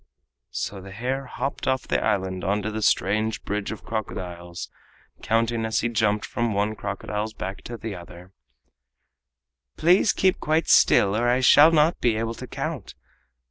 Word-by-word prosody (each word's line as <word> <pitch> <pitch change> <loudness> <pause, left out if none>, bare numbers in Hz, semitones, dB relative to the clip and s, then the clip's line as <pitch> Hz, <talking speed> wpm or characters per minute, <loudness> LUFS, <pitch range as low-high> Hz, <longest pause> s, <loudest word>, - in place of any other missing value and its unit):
So 100 -2 -4
the 95 - -11
hare 130 +5 -3
hopped 135 +2 -4
off 130 0 0
the - - 0
island 95 -2 -1
on 100 +3 0
to 110 - -2
the 110 0 -4
strange 110 +1 +1
bridge 105 0 -3
of 110 - -8
crocodiles, 90 -5 -5 0.5
counting 115 0 0
as 110 0 0
he 120 - 0
jumped 105 -2 +1
from 120 -3 -2
one 105 +2 0
crocodile's 105 +2 -4
back 95 +1 -6
to 120 - -6
the 110 -2 -6
other: 90 +1 -12 1.4
"Please 180 +5 +4
keep 190 -1 +1
quite 155 +2 0
still, 100 +1 +5
or 120 +2 +1
I 125 +1 +2
shall 145 +4 +7
not 160 +1 +3
be 120 -3 +2
able 115 +1 -2
to - - -9
count. - - -5
110 Hz, 165 wpm, -24 LUFS, 100-120 Hz, 1.4 s, shall